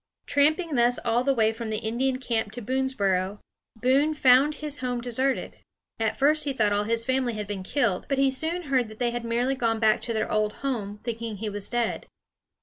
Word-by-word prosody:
Tramping 310 +3 +2
thus 245 -1 +3
all 235 +1 +2
the 275 0 +2
way 220 -1 +3
from 225 0 -6
the 215 - -1
Indian 240 +4 -1
camp 230 -5 -2
to 245 - -6
Boonesboro, 205 -7 0 0.4
Boone 270 +7 +2
found 275 +2 +5
his 295 -2 -5
home 250 -1 -2
deserted. 255 +3 -1 0.4
At 225 -1 0
first 300 +2 +3
he 280 - -1
thought 215 -5 +2
all 205 0 +1
his 230 +1 0
family 260 -2 0
had 210 -1 -4
been 200 -2 -5
killed; 200 -2 0
but 275 - +1
he 270 0 +3
soon 325 +6 -2
heard 260 -6 +1
they 240 0 0
had 240 0 -4
merely 240 +3 0
gone 230 -4 0
back 220 0 +3
to 235 - -4
their 220 -1 -1
old 215 0 +1
home, 210 -6 -3
thinking 230 -2 -4
he 215 +2 -3
was 205 -1 -4
dead. 240 -2 -1
240 Hz, 205 wpm, -26 LUFS, 220-265 Hz, 0.4 s, found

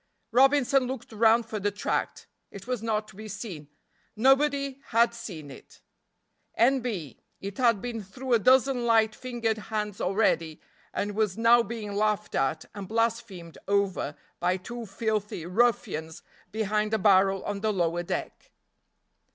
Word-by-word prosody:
Robinson 270 +1 +4
looked 255 -2 -6
round 225 +1 +4
for 220 -1 -4
the 205 +1 0
tract; 205 +1 -3 0.2
it 200 - -10
was 250 -3 -2
not 215 -1 -1
to 215 - -15
be 215 +2 -8
seen; 190 -7 -7 0.5
nobody 275 +3 +2
had 235 +1 +3
seen 160 -11 -8
it. 135 - -14 0.8
N. 265 +4 +4
B. 200 - -5 0.2
It 200 +3 -7
had 230 -5 +3
been 235 -2 -4
through 245 +7 -4
a 230 - +5
dozen 255 +1 +3
light 220 -1 +4
fingered 235 -3 -2
hands 210 -2 -3
already 180 -5 +1 0.3
and 205 0 -2
was 215 -3 0
now 230 +1 +6
being 225 -3 -5
laughed 210 0 0
at 135 +4 0
and 200 -2 -7
blasphemed 225 -6 -2
over 195 -7 0 0.2
by 180 +1 +1
two 235 +5 -7
filthy 210 -4 -2
ruffians 180 -6 0 0.3
behind 215 0 0
a - - +2
barrel 195 -1 +4
on 205 -1 -3
the 215 +1 0
lower 175 -3 0
deck. 175 - -5
215 Hz, 150 wpm, -27 LUFS, 195-235 Hz, 0.8 s, now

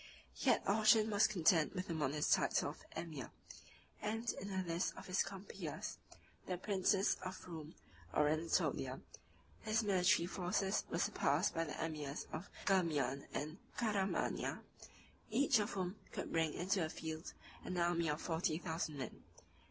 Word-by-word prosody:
Yet - - +3
Orchan 215 +1 +5
was 205 +1 +5
content 170 -4 +3
with 185 0 -2
the 170 - -2
modest 150 -1 +2
title - - +2
of - - -14
emir; 160 -6 -5 0.7
and 225 +3 -2
in 195 - -6
the 190 -2 -1
list 170 +2 0
of - - -8
his 185 0 +2
compeers, 195 0 -5 0.5
the 180 - -1
princes 195 +1 +2
of 185 0 -6
Roum 160 -2 -7 0.4
or 150 - +3
Anatolia, 160 +2 0 0.6
43 215 - -3
his 225 +1 +3
military 190 -2 +4
forces 190 +2 0
were - - -1
surpassed - - +2
by 165 - 0
the 150 - -5
emirs 150 -3 -3
of 155 - -5 0.2
Ghermian 155 -8 +2
and 155 +4 -4 0.2
Caramania, 205 -4 0 0.7
each 275 -4 +4
of 210 - 0
whom 185 +1 -2
could - - -4
bring 160 -2 +1
into 190 +3 +1
the 160 -3 0
field 160 0 -5 0.3
an 180 - -3
army 170 -1 +2
of 150 +1 0
forty 165 -1 0
thousand 160 -3 -3
men. 130 - -6
180 Hz, 150 wpm, -38 LUFS, 160-200 Hz, 0.7 s, Orchan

